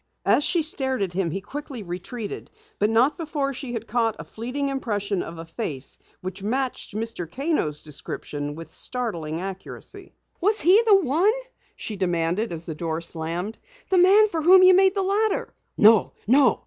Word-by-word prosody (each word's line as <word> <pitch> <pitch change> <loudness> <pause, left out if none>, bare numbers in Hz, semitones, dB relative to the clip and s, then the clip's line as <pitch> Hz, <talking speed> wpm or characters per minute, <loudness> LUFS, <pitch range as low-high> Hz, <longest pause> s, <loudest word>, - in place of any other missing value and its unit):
As 290 - +4
she 340 +1 +2
stared 265 -6 -1
at 185 -2 -3
him 185 -2 0
he 195 +5 -4
quickly 270 +1 -7
retreated, 195 +5 -6 0.3
but 210 - +3
not 250 +9 +3
before 295 -4 -2
she 255 -1 -6
had 230 -2 -4
caught 225 -1 0
a - - -7
fleeting 255 +5 -4
impression 205 -7 -2
of 165 - -7
a 165 - -7
face 160 - -6 0.2
which 185 +1 -6
matched 250 +1 -2
Mr. 215 -7 -4
Kano's 270 - -1
description 145 0 -5
with 165 +1 -10
startling 170 -11 -3
accuracy. 190 0 -8 0.3
"Was 420 +4 +4
he 375 +6 +6
the 410 -2 +8
one?" 335 +6 +3 0.4
she 215 - -5
demanded 175 +3 0
as 165 0 -6
the 160 - -4
door 160 0 -3
slammed. 170 +5 -4 0.3
"The 375 - +5
man 400 +4 +6
for 330 -6 -3
whom 370 +4 +7
you 370 0 +8
made 380 +1 +5
the 390 - +1
ladder?" 410 +2 0 0.2
"No, 215 -1 +6
no!" 255 +1 +4
225 Hz, 175 wpm, -24 LUFS, 175-295 Hz, 0.4 s, the